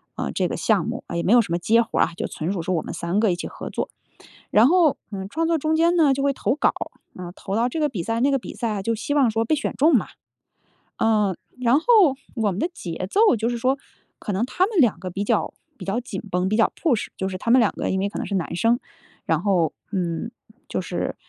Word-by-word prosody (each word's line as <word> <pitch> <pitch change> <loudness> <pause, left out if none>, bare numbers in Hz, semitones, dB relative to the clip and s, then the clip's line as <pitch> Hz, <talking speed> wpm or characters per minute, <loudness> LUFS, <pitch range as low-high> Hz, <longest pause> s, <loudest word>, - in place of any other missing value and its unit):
呃， 70 - -3
这 - - 0
个 - - -3
项 - - +1
目。 - - -4
啊， - - -5
也 - - 0
没 205 - +3
有 245 - +7
什 200 - -6
么 170 - +2
接 230 +6 +4
活 230 - -2
儿 - - +6
啊， - - -8
就 - - -3
纯 170 +5 -3
属 185 - -3
说 185 +3 -2
我 160 - 0
们 - - -6
三 170 +4 -1
个 215 -3 +3
一 - - 0
起 175 - -6
合 - - -8
作。 - - -3 0.6
然 215 +3 +6
后， 330 -1 +4 0.2
嗯， 190 -1 -5
创 320 +9 -1
作 335 0 +2
中 310 +2 +1
间 335 +2 +3
呢 315 -5 +4
就 275 - -2
会 280 - +3
投 265 - -1
稿， 295 - +2 0.4
呃， 180 -1 -7
投 195 - -5
到 230 +3 +2
这 290 - -4
个 300 -1 +2
比 215 -11 -4
赛 225 +6 -2
那 275 +3 +3
个 275 - +3
比 - - -8
赛， 215 -4 -2
就 230 - 0
希 230 +6 -2
望 275 -5 +4
说 225 +1 0
被 270 - +1
选 290 - -2
中 310 +3 +4
嘛。 225 - -1 0.9
呃， 210 -4 +2 0.3
然 250 +3 +4
后 - - -19 0.5
我 220 -4 +1
们 180 - -5
的 330 - 0
节 175 - -5
奏， 430 - +5
就 225 +2 0
是 240 - -2
说 260 +4 +1 0.4
可 210 - -4
能 200 +5 +1
他 365 +8 +1
们 420 -2 -2
两 230 - +3
个 185 0 -5
比 195 +3 -3
较 - - 0 0.2
比 - - -8
较 195 +4 0
紧 200 -6 -6
绷， 180 +1 0
比 215 - +2
较 225 - +4
push 255 -10 +1
就 190 - -2
是 185 - -5
他 230 - -3
们 255 +2 +7
两 220 - +2
个 - - -3
因 190 - 0
为 195 +1 0
可 - - -6
能 - - -3
是 200 - -4
男 185 -4 -2
生。 230 +6 +3 0.5
然 - - 0
后， 185 -6 +2 0.2
嗯， 180 +2 -2 0.4
就 - - -2
是 - - -3
225 Hz, 295 characters per minute, -23 LUFS, 190-275 Hz, 0.9 s, 有